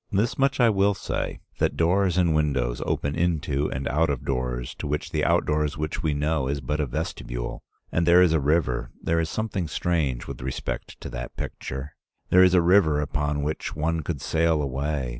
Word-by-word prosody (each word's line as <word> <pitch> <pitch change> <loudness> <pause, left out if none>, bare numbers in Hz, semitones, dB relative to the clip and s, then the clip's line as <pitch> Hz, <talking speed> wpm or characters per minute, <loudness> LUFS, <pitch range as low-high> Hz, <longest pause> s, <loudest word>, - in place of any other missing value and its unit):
This 105 +4 +1
much 135 0 +1
I 120 -2 +6
will 100 0 +2
say, - - -3 0.2
that - - +1
doors 90 +2 +2
and 85 -3 +3
windows 70 -6 0
open 70 - -1
into 75 -4 0
and 65 +1 -3
out 80 +3 +2
of 70 -4 -2
doors 60 0 -2
to 75 - -3
which 75 +1 -2
the - - 0
outdoors 75 0 +1
which 75 0 -3
we 75 -3 0
know 75 -2 0
is 70 +1 -1
but 75 +4 -2
a 75 - 0
vestibule. - - -4 0.3
And 85 0 +1
there 90 +1 +7
is 85 -3 +3
a 80 - +3
river; 70 -3 +1
there 85 0 0
is 80 -1 -1
something 100 -5 -2
strange 75 -6 -1
with - - -7
respect 65 +1 -5
to - - -6
that - - -6
picture. 65 +2 -5 0.4
There 90 0 +7
is 90 0 +5
a 90 - +5
river 85 -4 +4
upon 75 0 -1
which 75 +2 -3
one 80 +2 0
could 75 -2 -4
sail 80 +2 +2
away. 70 -1 -2
75 Hz, 195 wpm, -25 LUFS, 70-85 Hz, 0.4 s, there